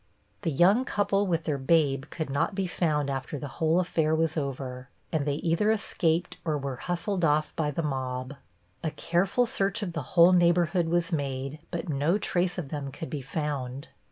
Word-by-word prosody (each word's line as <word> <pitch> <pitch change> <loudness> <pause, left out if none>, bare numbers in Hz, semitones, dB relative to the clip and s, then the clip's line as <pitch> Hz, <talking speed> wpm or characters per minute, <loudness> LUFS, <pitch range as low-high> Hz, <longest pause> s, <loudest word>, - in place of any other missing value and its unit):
The 180 - 0
young 185 - +4
couple 200 -3 +1
with 165 -2 0
their 150 -4 -1
babe 135 -1 +2
could 160 -4 -4
not 140 +8 0
be 195 -1 0
found 155 -5 0
after 135 +1 -3
the 145 - -5
whole 165 +1 +3
affair 160 -3 +1
was 160 0 +1
over, 130 -3 -4 0.2
and 150 -3 0
they 140 - +1
either 170 +7 +1
escaped 175 -5 0
or 155 -3 0
were 135 -2 -4
hustled 175 - -2
off 155 -1 +2
by 155 -2 0
the 155 +3 -2
mob. 130 -2 -3 0.5
A 160 - +1
careful 180 +9 +1
search 200 -1 0
of 175 -4 -4
the 165 - -2 0.2
whole 170 +2 +9
neighborhood 175 0 +3
was 170 +1 +1
made, 140 -1 -2
but 170 - -4
no 150 +5 +1
trace 180 -3 0
of 160 -6 -4
them 140 -2 -4
could 165 +3 -7
be 145 - -3
found. 140 -1 -4
160 Hz, 185 wpm, -28 LUFS, 140-175 Hz, 0.5 s, whole